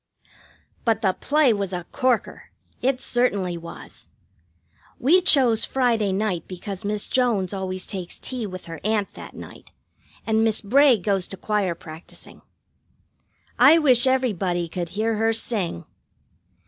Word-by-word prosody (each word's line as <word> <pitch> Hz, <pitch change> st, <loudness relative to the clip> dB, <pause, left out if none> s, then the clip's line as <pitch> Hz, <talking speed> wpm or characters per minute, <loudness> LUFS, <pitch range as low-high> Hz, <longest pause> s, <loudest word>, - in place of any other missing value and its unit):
But 225 Hz, -2 st, +1 dB
the 190 Hz, -2 st, +3 dB
play 290 Hz, 0 st, +2 dB
was 200 Hz, -2 st, -3 dB
a 175 Hz, -1 st, -4 dB
corker; 255 Hz, -3 st, -1 dB, 0.3 s
it 255 Hz, 0 st, +1 dB
certainly 200 Hz, -8 st, 0 dB
was. 170 Hz, 0 st, -10 dB, 0.9 s
We 335 Hz, +9 st, +4 dB
chose 255 Hz, -, +4 dB
Friday 235 Hz, -6 st, +1 dB
night 190 Hz, -4 st, -2 dB
because 185 Hz, +1 st, -6 dB
Miss 205 Hz, 0 st, -2 dB
Jones 220 Hz, -8 st, 0 dB
always 185 Hz, -1 st, -4 dB
takes 185 Hz, -4 st, -6 dB
tea 250 Hz, -4 st, -5 dB
with 185 Hz, -1 st, -8 dB
her 165 Hz, -2 st, -8 dB
aunt 210 Hz, -1 st, 0 dB
that -, -, -10 dB
night, -, -, -12 dB, 0.5 s
and 220 Hz, 0 st, +2 dB
Miss 220 Hz, -1 st, +3 dB
Bray 260 Hz, +4 st, +4 dB
goes 195 Hz, -1 st, -1 dB
to 195 Hz, -, -8 dB
choir 200 Hz, -3 st, -1 dB
practising. 160 Hz, 0 st, -11 dB, 1.2 s
I 325 Hz, -, +8 dB
wish 260 Hz, -5 st, +4 dB
everybody 195 Hz, -10 st, 0 dB
could 170 Hz, 0 st, -4 dB
hear 220 Hz, +3 st, -1 dB
her 225 Hz, +1 st, +2 dB
sing! 200 Hz, -, -2 dB
210 Hz, 135 wpm, -23 LUFS, 185-245 Hz, 1.2 s, I